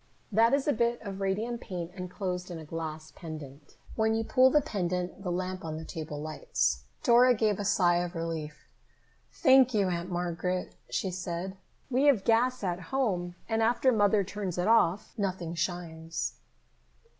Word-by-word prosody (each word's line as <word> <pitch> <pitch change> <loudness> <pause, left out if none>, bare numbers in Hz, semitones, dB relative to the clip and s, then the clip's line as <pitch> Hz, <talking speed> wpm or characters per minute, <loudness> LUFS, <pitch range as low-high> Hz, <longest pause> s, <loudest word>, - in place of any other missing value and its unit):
"That 230 +5 +5
is 280 0 -2
a 290 - +4
bit 235 +1 +1
of 195 -2 -6
radium 215 +5 -1
paint 175 -5 -5
enclosed 180 -1 -4
in 175 - -5
a 160 - -9
glass 155 0 -6
pendant. 150 -4 -9 0.2
When 220 0 +2
you 225 - 0
pull 255 +3 +5
the 300 - +5
pendant, 180 - -2
the 190 - -3
lamp 185 +1 -3
on 155 -1 -4
the 160 - -7
table 155 -3 -6
lights." 65 - -1 0.2
Dora 245 +1 +6
gave 215 -2 +1
a - - -1
sigh 175 -3 +3
of 175 +1 -2
relief. 160 -2 -5 0.6
"Thank 260 -4 +5
you, 200 -3 +3
Aunt 175 0 -3
Margaret," 180 +1 -2 0.2
she 190 - -1
said. 180 +1 -4 0.4
"We 260 +3 +3
have 265 -9 +5
gas 245 +1 +2
at 180 -2 -1
home, 185 -10 0
and 225 0 0
after 240 +3 +3
Mother 205 -2 +3
turns 195 -2 -4
it 180 - 0
off, 210 -4 +3
nothing 185 -4 -2
shines." 165 -1 -3
185 Hz, 170 wpm, -29 LUFS, 170-225 Hz, 0.6 s, Dora